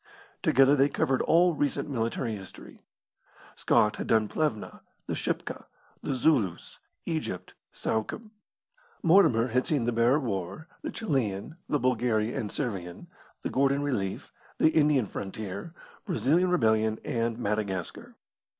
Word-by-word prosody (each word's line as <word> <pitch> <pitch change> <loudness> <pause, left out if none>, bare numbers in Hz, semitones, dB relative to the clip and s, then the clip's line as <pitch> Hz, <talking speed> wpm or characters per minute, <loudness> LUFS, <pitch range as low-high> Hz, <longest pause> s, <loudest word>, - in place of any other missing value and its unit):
Together 135 +2 +5
they 140 0 +4
covered 135 -2 +1
all 175 +1 +4
recent 145 0 -1
military 115 -3 -2
history. 95 -2 -11 0.7
Scott 105 0 +2
had - - -4
done 110 -1 +3
Plevna, 150 -4 -2 0.2
the - - -3
Shipka, - - -3 0.4
the 135 - -2
Zulus, 120 - +1 0.3
Egypt, 155 - -4 0.2
Suakim; 210 - -3 0.7
Mortimer 160 - +5
had 125 +2 +1
seen 145 -7 +1
the 120 - +1
Boer 120 +5 +3
War, 110 - -4
the - - -4
Chilian, 135 - -2
the 145 - +2
Bulgaria 120 -4 +1
and 105 - -3
Servian, 95 -10 -4 0.4
the - - -2
Gordon 140 +1 +2
relief, 105 -10 -3 0.2
the - - +5
Indian 150 -6 +3
frontier, 100 - -6 0.3
Brazilian 175 - +2
rebellion, 110 -8 +2
and 115 -1 -1
Madagascar. 100 -5 -3
125 Hz, 125 wpm, -28 LUFS, 110-145 Hz, 0.7 s, Together